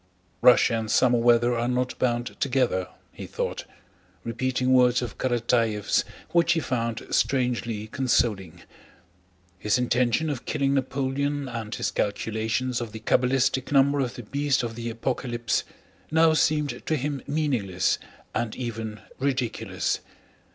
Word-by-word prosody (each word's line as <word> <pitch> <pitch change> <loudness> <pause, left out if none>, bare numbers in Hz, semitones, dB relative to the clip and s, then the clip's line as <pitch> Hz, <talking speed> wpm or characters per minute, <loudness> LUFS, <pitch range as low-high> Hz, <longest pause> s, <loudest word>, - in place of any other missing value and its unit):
"Russia 125 -1 +6
and 110 -1 -5
summer 120 +1 +4
weather 120 +1 +4
are 120 +1 0
not 125 0 -1
bound 120 -1 -1
together," 125 -9 +1 0.2
he - - -9
thought, - - -3 0.6
repeating 130 +2 0
words 125 -1 +4
of 120 - -7
Karatáev's 115 -4 +1 0.3
which 170 -1 +4
he 165 - +1
found 115 -6 -2
strangely 120 -5 0
consoling. 105 -8 0 1.0
His 105 +4 +1
intention 125 +4 +1
of 130 -4 -6
killing 140 -2 0
Napoleon 140 +1 -1
and 115 -3 -5
his - - -2
calculations 110 +4 -1
of 115 -3 -6
the 110 - -6
cabalistic 130 +3 +1
number 140 0 +4
of 125 -3 -1
the 120 - -7
beast 140 +3 0
of 115 -1 -3
the 115 +1 -5
Apocalypse 120 0 -1 0.5
now 160 0 +4
seemed 150 -2 +1
to 160 - +2
him 140 -1 -2
meaningless 125 - 0 0.3
and 115 -2 -2
even 115 -3 -5 0.2
ridiculous. 130 -3 -1
125 Hz, 130 wpm, -26 LUFS, 115-135 Hz, 1.0 s, Russia